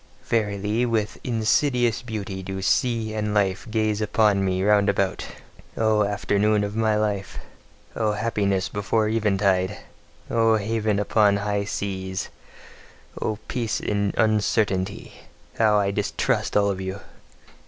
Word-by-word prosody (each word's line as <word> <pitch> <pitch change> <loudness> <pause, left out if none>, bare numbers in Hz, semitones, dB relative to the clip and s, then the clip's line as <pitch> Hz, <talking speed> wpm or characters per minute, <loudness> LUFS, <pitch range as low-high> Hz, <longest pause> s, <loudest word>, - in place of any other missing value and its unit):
Verily, 105 0 0
with 110 -3 -1
insidious 120 +1 +1
beauty 105 -5 -5
do 95 +1 -5
sea 115 0 +1
and 105 -1 -2
life 100 +1 0
gaze 110 -1 0
upon 105 -2 +2
me 95 0 0
round 105 0 +4
about: 95 -3 -1 0.5
O 110 -1 +3
afternoon 105 +1 +1
of 100 +1 -4
my 110 -1 +2
life! 105 -3 -2 0.6
O 110 -2 0
happiness 105 -3 0
before 105 +1 0
eventide! 100 -4 +1 0.5
O 115 -1 +3
haven 110 0 0
upon 105 0 +3
high 100 0 -1
seas! 95 -2 -4 0.9
O 110 - -1
peace 115 -4 -2
in 100 -1 -1
uncertainty! 105 -3 0 0.5
How 110 -2 +4
I 100 -1 +1
distrust 100 0 0
all 100 -1 +3
of 95 -1 -4
you! 95 +1 -4
105 Hz, 125 wpm, -24 LUFS, 100-110 Hz, 0.9 s, round